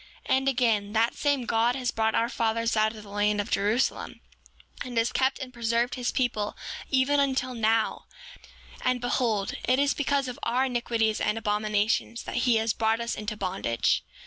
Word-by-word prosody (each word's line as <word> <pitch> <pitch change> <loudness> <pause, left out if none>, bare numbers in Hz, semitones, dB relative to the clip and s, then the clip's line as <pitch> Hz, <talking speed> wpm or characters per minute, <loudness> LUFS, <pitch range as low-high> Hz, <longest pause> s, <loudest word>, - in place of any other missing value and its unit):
7:20 265 - +4
And 265 +1 -2
again, 225 -6 +1
that 230 +1 +2
same 285 -4 0
God 230 +2 +2
has 250 -3 -1
brought 220 0 0
our 230 - +2
fathers 230 0 0
out 215 +1 +2
of 215 - -10
the 205 - -13
land 205 +1 +1
of 205 - -3
Jerusalem, 215 +6 0 0.6
and 245 -2 -6
has 230 +1 +2
kept 265 0 +1
and 260 -2 -7
preserved 235 +1 0
his 250 -1 -2
people 220 -5 -1 0.3
even 275 +2 +3
until 260 -2 0
now; 225 -1 +1 0.8
and 255 0 +1
behold, 230 -4 0
it 255 +1 +3
is 280 +1 +2
because 280 -2 0
of 250 - -6
our 255 +3 +1
iniquities 235 -3 0
and 210 - 0
abominations 215 +1 0
that - - -5
he 235 - +5
has 220 0 +1
brought 225 0 +1
us 235 0 -2
into 210 0 -5
bondage. 180 - 0
230 Hz, 180 wpm, -27 LUFS, 215-255 Hz, 0.8 s, he